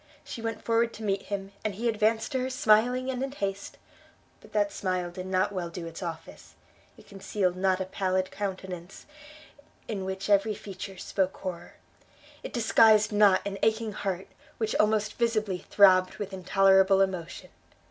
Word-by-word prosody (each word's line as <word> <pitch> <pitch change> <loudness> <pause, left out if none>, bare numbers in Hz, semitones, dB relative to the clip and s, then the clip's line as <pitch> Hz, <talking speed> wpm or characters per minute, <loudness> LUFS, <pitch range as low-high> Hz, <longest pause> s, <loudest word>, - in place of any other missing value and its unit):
she 230 - -8
went 225 -1 -4
forward 230 0 +1
to 225 - -9
meet 195 -2 0
him, 195 -1 -4
and 215 -3 -2
he 235 +4 -2
advanced 220 +1 +1
to 260 - 0
her 255 +1 -2
smiling 250 +2 +3
and 255 -1 -4
in 270 0 -2
haste; 200 -6 -4 0.6
but - - -18
that 205 -1 +1
smile 185 -2 -2
did 185 +1 -7
not 185 +1 +1
well 180 -3 -4
do 170 0 -7
its 165 +2 -8
office; 165 -2 -8 0.4
it - - -17
concealed 195 -2 -2
not 185 0 +1
a 190 - -2
pallid 185 0 -1
countenance, 190 -3 -6 0.8
in 200 -4 -4
which 190 +1 -4
every 205 +1 +3
feature 195 -1 -8
spoke 190 +1 -2
horror; 180 -2 -7 0.7
it - - -7
disguised 220 -2 +4
not 205 -2 +4
an 195 -1 -4
aching 220 0 +1
heart, 190 -2 -3 0.3
which 220 -1 -1
almost 215 +1 +1
visibly 215 -5 0
throbbed 185 -2 +5
with 205 -2 -6
intolerable 190 +1 +4
emotion! 185 -3 -3
195 Hz, 165 wpm, -28 LUFS, 185-215 Hz, 0.8 s, throbbed